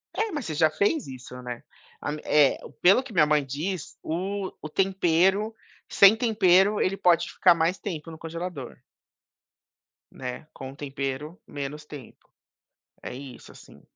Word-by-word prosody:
É, 440 Hz, 0 st, -1 dB
mas 295 Hz, -7 st, -4 dB
você 160 Hz, -, -3 dB
já 160 Hz, +1 st, +4 dB
fez 205 Hz, -, 0 dB
isso, 130 Hz, -1 st, -9 dB
né, 120 Hz, -1 st, -6 dB, 0.4 s
a 145 Hz, -, -3 dB
eh, 145 Hz, -2 st, +4 dB, 0.2 s
pelo 195 Hz, +8 st, +6 dB
que 260 Hz, -4 st, -11 dB
minha 155 Hz, -5 st, +5 dB
mãe 150 Hz, -1 st, +2 dB
diz, 155 Hz, +6 st, -4 dB
o 190 Hz, +4 st, -3 dB
o 155 Hz, -, -6 dB
tempero 190 Hz, +4 st, +2 dB, 0.4 s
sem 200 Hz, +2 st, +7 dB
tempero, 205 Hz, -3 st, +4 dB
ele 195 Hz, +1 st, 0 dB
pode 170 Hz, -2 st, +3 dB
ficar 180 Hz, -, +5 dB
mais 165 Hz, +3 st, +1 dB
tempo 165 Hz, -4 st, -6 dB
no 160 Hz, -, -10 dB
congelador. 165 Hz, -4 st, -6 dB, 1.3 s
Né, 125 Hz, +4 st, -7 dB
com 130 Hz, -1 st, -8 dB
o -, -, -14 dB
tempero 140 Hz, +3 st, -5 dB
menos 145 Hz, +1 st, -6 dB
tempo. 145 Hz, -5 st, -12 dB, 0.7 s
É -, -, -7 dB
isso, 130 Hz, -1 st, -10 dB
assim. -, -, -16 dB
165 Hz, 150 wpm, -26 LUFS, 145-195 Hz, 1.3 s, sem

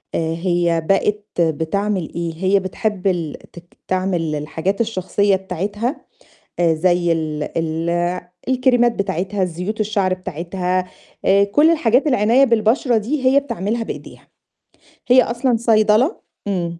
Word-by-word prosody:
آآ -, -, +1 dB, 0.2 s
هي 170 Hz, -1 st, 0 dB
بقت 210 Hz, +1 st, +1 dB, 0.2 s
بتعمل 170 Hz, +4 st, -1 dB
إيه؟ 170 Hz, -1 st, -3 dB
هي 190 Hz, +4 st, +2 dB
بتحب 195 Hz, +1 st, -3 dB
ال 170 Hz, -5 st, -1 dB, 0.2 s
تك 175 Hz, 0 st, -15 dB
تعمل 180 Hz, -4 st, -1 dB
الحاجات 160 Hz, +7 st, -2 dB
الشخصية 200 Hz, -2 st, +1 dB
بتاعتها، 200 Hz, -, -3 dB, 0.6 s
آآ 170 Hz, -2 st, +3 dB
زَي 175 Hz, +1 st, +2 dB
ال 155 Hz, -2 st, -2 dB, 0.2 s
ال 170 Hz, +2 st, -1 dB, 0.3 s
الكريمات 245 Hz, -2 st, +3 dB
بتاعتها، 195 Hz, -1 st, -2 dB
الزيوت 180 Hz, +5 st, -3 dB
الشعر 200 Hz, -3 st, +1 dB
بتاعتها، 180 Hz, +1 st, -3 dB, 0.4 s
آآ 200 Hz, +1 st, +4 dB
كلّ 290 Hz, +11 st, +4 dB
الحاجات 265 Hz, -4 st, +2 dB
العناية 250 Hz, 0 st, +4 dB
بالبشرة 235 Hz, +1 st, +2 dB
دي، 260 Hz, +5 st, -1 dB
هي 270 Hz, +2 st, +5 dB
بتعملها 230 Hz, -3 st, -3 dB
بإيديها. -, -, -9 dB, 0.8 s
هي 255 Hz, +1 st, +6 dB
أصلًا 240 Hz, 0 st, 0 dB
صيدلة 220 Hz, -, +2 dB, 0.3 s
إمم. 170 Hz, -4 st, -2 dB
195 Hz, 125 wpm, -19 LUFS, 175-225 Hz, 0.8 s, هي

